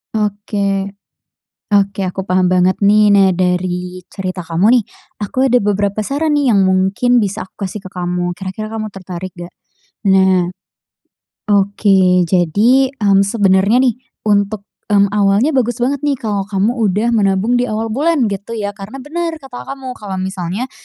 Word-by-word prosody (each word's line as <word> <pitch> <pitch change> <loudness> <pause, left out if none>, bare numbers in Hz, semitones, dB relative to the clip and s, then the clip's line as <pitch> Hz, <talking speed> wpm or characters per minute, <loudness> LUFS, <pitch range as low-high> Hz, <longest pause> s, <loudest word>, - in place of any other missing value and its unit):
Oke, 200 -2 -1 0.8
oke, 200 -1 +1
aku 190 +1 -4
paham 185 -1 +1
banget 185 +1 +2
nih. 210 +1 +4
Nah, 195 -1 +5
dari 180 0 -1
cerita 185 -1 -5
kamu 170 +3 0
nih, - - -4 0.4
aku 215 +6 -1
ada 250 - +5
beberapa 205 0 0
saran 285 +8 -1
nih 265 -5 +2
yang 195 - +4
mungkin 190 +6 +2
bisa 205 -3 -2
aku 190 +1 -7
kasih 195 +2 -8
ke 190 - -9
kamu, 175 -1 -2
kira-kira 190 +4 -6
kamu 220 -1 -4
tertarik 185 -1 -7
nggak? 175 0 -9 0.6
Nah. 190 -2 +3 1.0
Oke, 195 -3 +3
jadi, 220 - +3
mmm, 200 -5 +3
sebenernya 200 +3 +3
nih, 245 -3 +1 0.2
untuk, 205 0 0 0.2
mmm, 200 -1 +3
awalnya 205 +6 +2
bagus 245 -4 0
banget 275 +3 +1
nih 290 - +2
kalau 215 -7 -3
kamu 210 +4 -1
udah 215 +1 +1
menabung 210 +1 +2
di 245 - +1
awal 225 -1 -3
bulan 280 0 +1
gitu 200 +3 -5
ya. 210 -3 -3
Karena 205 +6 -9
bener 330 +4 -3
kata 265 -2 -9
kamu, 265 -2 -7
kalau 195 -3 -5
misalnya, 190 +5 -4
200 Hz, 155 wpm, -16 LUFS, 190-230 Hz, 1.0 s, Nah